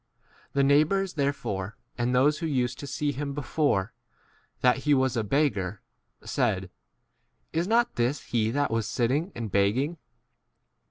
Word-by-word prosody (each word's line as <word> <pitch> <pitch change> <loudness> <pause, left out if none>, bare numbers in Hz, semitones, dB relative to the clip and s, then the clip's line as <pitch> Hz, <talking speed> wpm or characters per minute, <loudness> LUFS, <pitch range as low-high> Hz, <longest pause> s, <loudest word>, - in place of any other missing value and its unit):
8 - - -45
The 140 - +3
neighbours 155 +7 +3
therefore, 115 - -2 0.2
and 120 0 0
those 145 +4 +3
who 165 - -2
used 125 -4 -1
to 140 - -6
see 145 +1 -1
him 140 +1 -4
before, 140 -8 0 0.7
that 125 +1 +4
he 145 +1 +2
was 130 -1 +1
a 115 - 0
beggar,* 105 -6 0 0.4
1 - - -16
said, - - 0 0.8
Is 170 +2 0
not 235 +2 +2
this 125 +4 0
he 110 -2 0
that 140 +2 0
was 115 -2 0
sitting 130 +8 +1
and 115 - -4
9 - - -2
begging 110 - +1
135 Hz, 160 wpm, -27 LUFS, 115-150 Hz, 0.8 s, that